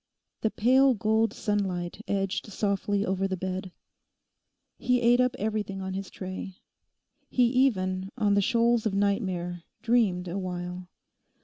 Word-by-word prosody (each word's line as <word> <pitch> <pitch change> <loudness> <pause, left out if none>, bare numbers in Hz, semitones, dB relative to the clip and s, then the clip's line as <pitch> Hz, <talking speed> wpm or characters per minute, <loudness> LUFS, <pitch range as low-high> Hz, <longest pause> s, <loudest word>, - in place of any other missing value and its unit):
The 220 - +2
pale 260 +4 +4
gold 220 +2 +2
sunlight 190 -3 -2
edged 195 0 -1
softly 200 0 0
over 190 0 0
the 190 -1 -3
bed. 185 +1 -4 1.1
He 250 0 +2
ate 240 +1 +4
up 250 0 +1
everything 210 -2 -2
on 190 0 -4
his 195 0 -5
tray. 185 0 -7 0.7
He 250 - +3
even, 195 -7 +1
on 210 -4 +2
the 200 - +4
shoals 230 +2 +2
of 195 - -2
nightmare, 190 -4 -1 0.2
dreamed 210 -7 +2
awhile. 180 0 -4
200 Hz, 130 wpm, -27 LUFS, 185-225 Hz, 1.1 s, pale